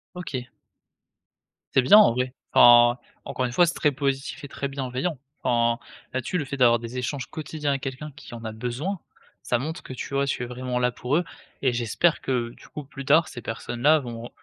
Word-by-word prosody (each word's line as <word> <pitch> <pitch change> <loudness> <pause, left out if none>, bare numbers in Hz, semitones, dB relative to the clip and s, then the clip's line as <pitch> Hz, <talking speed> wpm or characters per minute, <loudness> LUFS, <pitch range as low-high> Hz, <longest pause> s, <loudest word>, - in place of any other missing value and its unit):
OK. 130 -8 -5 1.3
C'est 135 - +5
bien, 135 +12 +7
en 210 - +7
vrai. 125 +1 -2 0.2
Enfin, 120 0 +7 0.3
encore 130 - -2
une 120 - -3
fois, 175 +7 +5
c'est 170 - -1
très 150 - +2
positif 135 +1 -2
et - - -6
très 140 0 -4
bienveillant. 135 +3 -3 0.2
Enfin, 120 -1 +1 0.3
là 130 - 0
dessus, 180 - -2
le 145 - -2
fait 140 - -5
d'avoir 120 -3 +5
des 120 +2 -6
échanges 130 +1 -3
quotidiens 150 -1 -4
avec 135 -1 -1
quelqu'un 135 +3 -5
qui 135 -6 -11
en 115 - -9
a 110 - -3
besoin, 125 - -3 0.4
ça 120 - 0
montre 155 +6 -4
que, - - -11
tu 130 - -7
vois, 140 0 +1
tu 125 - -1
es - - -2
vraiment 125 +1 -4
là 125 0 +2
pour 125 +5 -1
eux, 175 - +1 0.4
et 130 -3 +3
j'espère 120 +8 +1
que, 120 -3 -1
du - - -16
coup, 150 - -7
plus 135 -1 -9
tard, 155 +4 +5
ces 125 -5 -8
personnes 120 +1 -5
là 155 +3 +6
vont 120 -3 -7
130 Hz, 215 wpm, -25 LUFS, 120-145 Hz, 1.3 s, bien